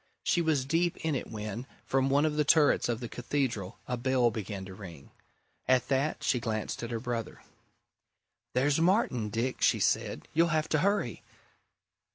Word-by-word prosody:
She 175 - +2
was 155 -5 +1
deep 165 +4 +1
in 160 - +1
it 135 - -3
when, 110 +3 -5 0.2
from 135 0 +1
one 140 +3 +3
of 155 -1 0
the 150 - +3
turrets 150 -4 +4
of 120 0 -1
the 120 - -4
Cathedral, 120 -6 -2
a 125 - -2
bell 125 -1 +2
began 100 -3 -5
to 95 - -9
ring. 85 -7 -11 0.6
At 130 -1 +3
that, 140 +3 0
she 125 - +2
glanced 110 -2 -3
at 115 - -4
her 115 -2 -2
brother. 115 -2 -4 1.1
"There's 140 +4 +3
Martin, 165 - +2
Dick!" 120 +4 -2
she - - +4
said. - - 0
"You'll 165 +2 +4
have 155 -1 0
to 155 - +2
hurry." 200 +5 0
130 Hz, 175 wpm, -30 LUFS, 115-150 Hz, 1.1 s, turrets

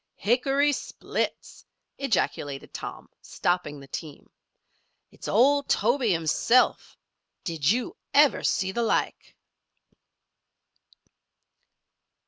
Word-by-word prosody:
"Hickory 270 +6 +2
splits!" 285 - -4 0.4
ejaculated 160 - -2
Tom, - - -7
stopping 175 -5 -2
the 140 - -13
team. 150 +1 -8 0.8
"It's - - -10
old 280 +6 +3
Tobe 240 +7 +2
himself! 215 +4 +2 0.5
Did 160 -4 -1
you 250 - 0 0.2
ever - - +5
see 190 0 0
the 235 - -2
like!" 230 - -1
220 Hz, 85 wpm, -26 LUFS, 165-260 Hz, 0.8 s, ever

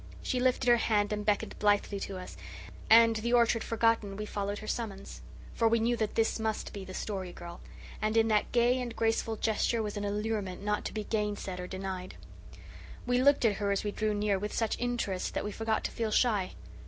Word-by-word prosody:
She 255 - -1
lifted 255 0 +1
her 240 0 +7
hand 210 -2 +1
and 210 0 -2
beckoned 205 -1 -1
blithely 205 -1 +2
to 195 -1 -5
us; 185 - -8 0.5
and, 230 0 +7
the 235 +2 -1
orchard 235 -1 +4
forgotten, 225 -3 +1
we 210 - -4
followed 205 -1 -3
her 215 - -8
summons. 200 -5 -5 0.3
For 230 - +2
we 230 +1 +3
knew 235 +2 +2
that 215 -2 -2
this 225 0 +1
must 220 -1 -2
be 200 - -6
the 185 0 -8
Story 190 -4 -4
Girl; 170 0 -10 0.4
and 215 +1 +1
in 225 0 +4
that 210 -1 +2
gay 245 +1 +3
and 240 -2 -5
graceful 225 0 0
gesture 220 +1 0
was 210 0 -4
an 205 - -3
allurement 205 -2 -2
not 210 0 -1
to - - -3
be 215 - -3
gainsaid 205 -3 -2
or 180 - -5
denied. 185 -1 -5 0.9
We 245 0 +2
looked 280 -1 +4
at 210 -3 +3
her 200 -1 0
as 200 - 0
we 205 - -2
drew 215 0 -1
near 205 -1 +1
with 210 +2 -4
such 225 -2 0
interest 240 -6 -2
that - - -1
we 210 - -3
forgot 225 +1 -1
to - - -2
feel 225 -2 -2
shy. 210 -4 +2
215 Hz, 215 wpm, -30 LUFS, 200-230 Hz, 0.9 s, her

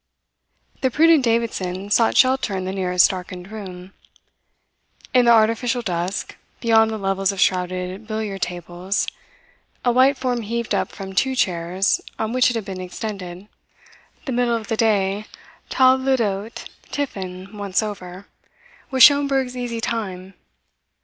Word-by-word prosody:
The 260 - +2
prudent 315 +2 +5
Davidson 205 -5 -1
sought 230 +1 +3
shelter 255 -6 +3
in 185 - -3
the 190 - -2
nearest 180 -2 +3
darkened 180 0 -8
room. 190 -3 -9 1.2
In 250 -1 +5
the 235 - +6
artificial 230 +2 +3
dusk, 180 0 -3 0.2
beyond 225 -1 +4
the 220 - -3
levels 195 -1 0
of 195 - -7
shrouded 185 +2 -1
billiard 215 -3 -4
tables, 175 +2 -2 0.8
a 245 - +4
white 260 +3 +4
form 250 -2 -1
heaved 235 +2 -3
up - - 0
from 190 -2 -8
two 265 +7 +1
chairs 185 -1 +1 0.2
on 220 +1 -2
which 255 0 +4
it 245 - -3
had 225 -3 -3
been 190 -2 -6
extended. 185 -1 -6 0.8
The 270 - -3
middle 240 -1 +1
of 220 -2 -5
the 225 - +1
day, 205 -2 +1 0.4
table 260 0 +4
d'hote 210 0 -3 0.2
tiffin 190 -7 -5
once 200 0 -1
over, 190 -2 -7 0.6
was 260 -2 +5
Schomberg's 275 -3 +5
easy 240 -2 -3
time. 195 -5 -4
210 Hz, 140 wpm, -21 LUFS, 185-240 Hz, 1.2 s, the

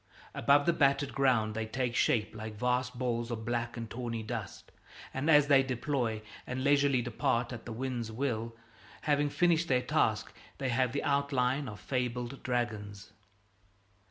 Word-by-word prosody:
Above 145 +1 +4
the 170 - +3
battered 140 -2 +2
ground 125 -6 +2
they 110 0 -3
take 125 +1 -2
shape 110 -2 +2
like 110 0 -6
vast 125 +2 0
balls 120 -2 -1
of 110 -2 -4
black 120 +1 -2
and 115 -1 -4
tawny 115 -2 -4
dust; 110 -3 -6 0.4
and 135 +4 -1
as 150 -2 +7
they 140 -2 +6
deploy 125 -4 -1 0.2
and 130 +1 -3
leisurely 140 -3 +3
depart 120 0 0
at 115 - -8
the - - -5
wind's 120 -1 -3
will, 115 -2 -2 0.5
having 145 -1 +2
finished 170 +1 +2
their 125 -3 +2
task, - - +1 0.2
they 135 - -2
have 125 0 +1
the 140 - -2
outline 140 -1 +1
of 105 -3 -9
fabled 125 +1 -3
dragons. 105 -5 -3
125 Hz, 155 wpm, -31 LUFS, 115-140 Hz, 0.5 s, as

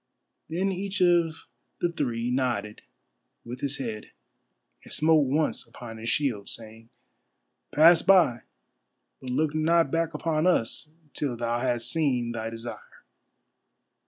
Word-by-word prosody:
Then 185 +4 0
each 195 +2 -4
of 170 -2 +2 0.3
the 175 - 0
three 120 -6 -2
nodded 120 -5 -1 0.6
with 120 +2 -7
his 140 0 -1
head, 110 -5 -5 0.7
and - - -14
smote 155 -2 +3
once 150 +3 0
upon 115 -2 -10
his 115 +1 -4
shield, 115 -8 -1
saying: 115 0 -6 0.8
"Pass 165 +2 +6
by, 170 -12 +4 0.8
but 130 - -8
look 145 +4 0
not 160 -1 +2
back 165 -1 0
upon 155 +1 0
us, 150 -2 +1 0.2
till 135 -5 -2
thou 120 0 -1
hast 120 -2 0
seen 130 -7 0
thy 115 -1 -4
desire." 115 +1 -9
135 Hz, 130 wpm, -27 LUFS, 120-165 Hz, 0.8 s, Pass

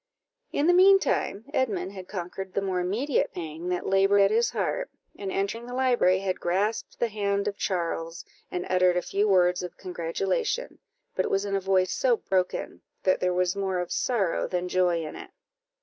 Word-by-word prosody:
In 285 - +1
the 350 - +5
mean 385 +2 +7
time, 210 - -1
Edmund 200 - 0
had 190 -2 -9
conquered 190 0 -6
the 200 - +1
more 185 -2 -1
immediate 220 +11 0
pang 165 0 -5
that 180 -1 -2
laboured 195 +1 +4
at 195 +1 +4
his 230 +2 +3
heart, - - -2 0.3
and, 195 -1 -5
entering 215 +5 -2
the 245 - -6
library, 245 -8 +3
had 185 -1 -2
grasped 200 +6 -1
the 235 - +1
hand 200 -1 -1
of 205 - -2
Charles, 170 -3 -3 0.2
and 180 0 -3
uttered 180 -1 +3
a 180 - 0
few 205 +2 0
words 180 -2 +3
of 180 -1 -7
congratulation, 185 - -2 0.4
but - - +1
it - - -2
was 195 +1 0
in 200 -1 -1
a 195 - 0
voice 185 -1 +2
so 245 -3 +2
broken, 185 -3 -2 0.2
that 185 - +3
there 180 - +1
was 180 0 +1
more 190 -2 -1
of 180 -1 -3
sorrow 205 -9 0
than 180 0 -2
joy 180 -2 +1
in 155 - -7
it. - - -9
190 Hz, 195 wpm, -27 LUFS, 180-205 Hz, 0.4 s, mean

